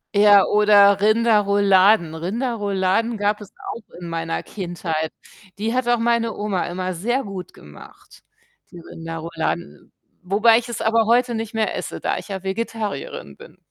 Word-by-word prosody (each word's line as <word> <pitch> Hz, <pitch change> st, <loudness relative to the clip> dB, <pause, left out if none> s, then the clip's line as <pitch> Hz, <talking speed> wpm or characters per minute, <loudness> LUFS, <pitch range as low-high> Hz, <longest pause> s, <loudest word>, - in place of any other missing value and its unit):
Ja, 205 Hz, -1 st, +6 dB
oder 205 Hz, -1 st, +5 dB
Rinderrouladen. 205 Hz, -5 st, +3 dB
Rinderrouladen 205 Hz, +2 st, -1 dB
gab 205 Hz, +1 st, 0 dB
es 205 Hz, -, -11 dB, 0.2 s
auch 230 Hz, -, -10 dB, 0.2 s
in 175 Hz, -, -8 dB
meiner 165 Hz, 0 st, -3 dB
Kindheit. 170 Hz, -4 st, -4 dB, 0.5 s
Die 225 Hz, +3 st, -1 dB
hat 255 Hz, -1 st, -1 dB
auch 240 Hz, -1 st, +2 dB
meine 230 Hz, -1 st, +1 dB
Oma 205 Hz, -3 st, -2 dB
immer 185 Hz, +1 st, -3 dB
sehr 240 Hz, +10 st, -1 dB
gut 195 Hz, -3 st, -8 dB
gemacht, -, -, -16 dB, 0.5 s
die 175 Hz, -, -11 dB
Rinderrouladen, 165 Hz, +1 st, -6 dB, 0.3 s
wobei 215 Hz, +5 st, +4 dB
ich 240 Hz, 0 st, -9 dB
es 235 Hz, -, -5 dB
aber 225 Hz, 0 st, +2 dB
heute 240 Hz, 0 st, +2 dB
nicht 225 Hz, 0 st, -5 dB
mehr 220 Hz, -1 st, -1 dB
esse, -, -, -5 dB
da -, -, -1 dB
ich -, -, -9 dB
ja 190 Hz, -2 st, -4 dB
Vegetarierin 195 Hz, -, -4 dB
bin. -, -, -15 dB
205 Hz, 150 wpm, -21 LUFS, 185-225 Hz, 0.5 s, Ja